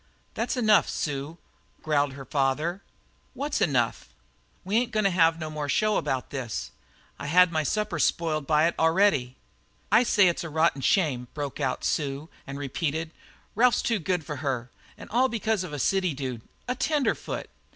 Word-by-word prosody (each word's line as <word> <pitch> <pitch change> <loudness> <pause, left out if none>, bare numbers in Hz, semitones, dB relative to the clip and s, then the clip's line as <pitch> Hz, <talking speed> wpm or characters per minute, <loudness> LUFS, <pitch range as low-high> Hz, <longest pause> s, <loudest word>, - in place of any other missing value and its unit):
"That's - - -2
enough, 215 -4 +4
Sue," 145 +2 -3 0.5
growled 145 -3 +1
the 135 -1 -9
father. 145 +7 0 0.5
"What's 285 +1 -2
enough?" 120 -5 +1 0.6
"We 200 +4 +1
ain't 240 0 +1
goin' 215 -1 +1
to 195 - +3
have 165 -2 +3
no 155 -1 -5
more 150 -1 -4
show 215 +5 +2
about 130 -1 -2
this. 115 - -4 0.5
I've 140 - -5
had 180 +2 +6
my 160 -1 +1
supper 200 +2 -1
spoiled 155 -3 0
by 155 0 +4
it 170 - +2
already." 160 -7 +3 0.5
"I 225 - +7
say 205 -5 +4
it's 175 - 0
a 165 - -5
rotten 160 -2 +1
shame," 135 -8 +1
broke 145 -2 -4
out 135 -3 -1
Sue, 145 +1 -2 0.2
and 135 - -6
she - - -6
repeated, 155 +3 -2 0.4
"Ralph's 240 +3 +3
too 230 -3 +1
good 175 -1 -1
for 150 - -5
her. 130 -4 -3 0.4
All 255 +4 +3
because 220 -4 -1
of 180 - -7
a 145 - -4
city 185 +2 +1
dude 130 -4 -4 0.3
a 250 - 0
tenderfoot!" 290 +2 -1
160 Hz, 170 wpm, -26 LUFS, 140-195 Hz, 0.6 s, I